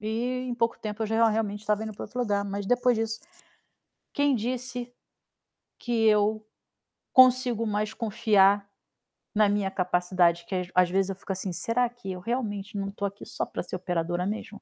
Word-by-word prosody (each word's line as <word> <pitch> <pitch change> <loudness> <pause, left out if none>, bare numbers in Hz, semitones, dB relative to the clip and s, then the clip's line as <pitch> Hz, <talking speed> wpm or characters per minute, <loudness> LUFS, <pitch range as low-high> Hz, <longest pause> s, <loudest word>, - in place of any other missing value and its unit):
E 245 +4 -2
em 245 - -2
pouco 230 -1 0
tempo 215 0 -4
eu - - 0
já 225 +1 -1
já 230 0 +5
realmente 210 -2 -1
estava 210 0 0
indo 220 0 -5
para 205 - -7
outro 250 +4 -5
lugar, 205 -4 0
mas 200 0 -4
depois 245 +1 +3
disso, 225 0 -2 0.9
quem 285 -2 +2
disse 245 +1 -3 0.9
que 240 - -5
eu 215 0 +3 0.7
consigo 255 -3 +5
mais 210 0 -1
confiar 205 -2 +3 0.7
na 210 0 +5
minha 200 -1 +1
capacidade? 180 -2 +1
Que 190 - -3
às 180 -1 -2
às 180 -1 +4
vezes 195 +1 +1
eu - - -5
fico 195 - -7
assim: 190 0 -3
"Será 245 +7 +1
que 240 -5 -8
eu 180 - -5
realmente 210 -1 -3
não 195 0 -3
tô 200 0 -4
aqui 200 0 -6
só - - -3
pra - - -5
ser 180 - -5
operadora 175 -1 -2
mesmo?". 210 +1 -5
210 Hz, 185 wpm, -27 LUFS, 195-230 Hz, 0.9 s, já